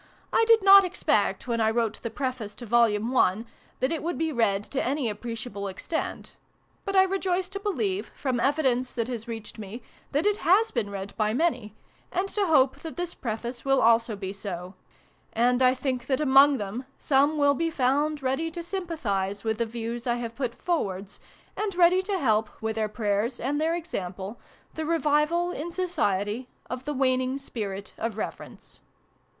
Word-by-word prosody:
I 455 - +4
did 455 -3 +6
not 395 0 +9
expect, 365 -6 0
when 230 -1 0
I 220 - +4
wrote 225 -1 -1
the 230 - -3
Preface 240 -4 -4
to 240 - -9
Vol. 235 +1 +5 0.3
I, 200 +5 +2 0.4
that 260 +4 +1
it 325 - -1
would 345 +2 -2
be 320 0 0
read 205 -6 +1
to 275 - 0
any 275 -1 0
appreciable 220 -2 -5
ex 190 -1 -8
tent: 320 - -3 0.5
but 390 -1 -2
I 380 - +7
rejoice 375 -1 0
to 395 +1 -5
believe, 225 - -2
from 255 -3 -1
evidence 260 -2 +1
that 230 -2 -1
has 235 -2 -5
reached 225 -1 -7
me, 215 +3 -7 0.3
that 290 +6 +1
it 415 0 +3
has 405 +6 +3
been 230 -5 -1
read 200 0 -6
by 215 0 +1
many, 250 -9 0 0.4
and 370 +2 0
to 405 -1 0
hope 270 -5 +4
that 325 +1 -8
this 350 -1 -2
Preface 235 +1 -4
will 270 -1 +3
also 230 -1 +4
be 195 -1 -5
so: 185 -2 -6 0.6
and 245 +2 +2
I 255 0 +5
think 255 -2 -3
that, 265 -2 +1
among 280 -1 +6
them, 220 +5 -5
some 285 +2 +2
will 285 -1 +4
be 330 +4 0
found 290 +1 +1
ready 270 +6 0
to 340 +1 -6
sympathise 235 - -2
with 220 0 -1
the 235 - +1
views 235 +2 -5
I 240 - +2
have 235 -1 -4
put 250 -3 -3
forwards, 195 - -2 0.4
and 420 -3 -2
ready 360 +1 +5
to 390 0 -2
help, 220 - +2
with 220 -1 -2
their 215 -1 -1
prayers 210 +3 -1
and 290 +4 -1
their 325 +2 +1
example, 195 - -5 0.3
the 315 - -4
revival, 330 +2 +2
in 340 +1 -5
Society, 245 - -1 0.2
of 250 +1 -5
the 295 - -2
waning 255 0 +1
spirit 205 -7 -6
of 225 -2 -3
reverence. - - -7
255 Hz, 185 wpm, -27 LUFS, 220-320 Hz, 0.6 s, not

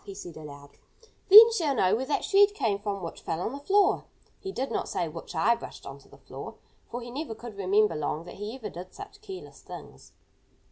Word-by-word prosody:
he 200 - -9
said 175 -4 -9
aloud. 145 -2 -11 0.6
"Then 440 +4 +11
she'll 320 -11 0
know 185 -4 +3
where 260 +3 -3
that 295 - 0
shred 405 +1 +4
came 205 - 0
from 200 -2 -4
which 165 - -7
fell 160 - -3
on 185 - -2
the 280 - -7
floor." 390 +7 +2 0.3
He 385 - -6
did 270 -6 -3
not - - -2
say 175 - -1
"which 165 +3 -9
I 200 +9 +4
brushed - - -9
onto - - -11
the - - -16
floor," - - -9 0.3
for 240 +1 -5
he 240 - -8
never 275 -3 -5
could 230 -1 -10
remember 200 +2 +2
long 150 +1 -2
that 175 - -9
he 210 +4 -5
ever 265 - -7
did 180 +2 -10
such 400 - -11
careless 385 -3 -10
things. - - -12
220 Hz, 220 wpm, -28 LUFS, 180-300 Hz, 0.6 s, Then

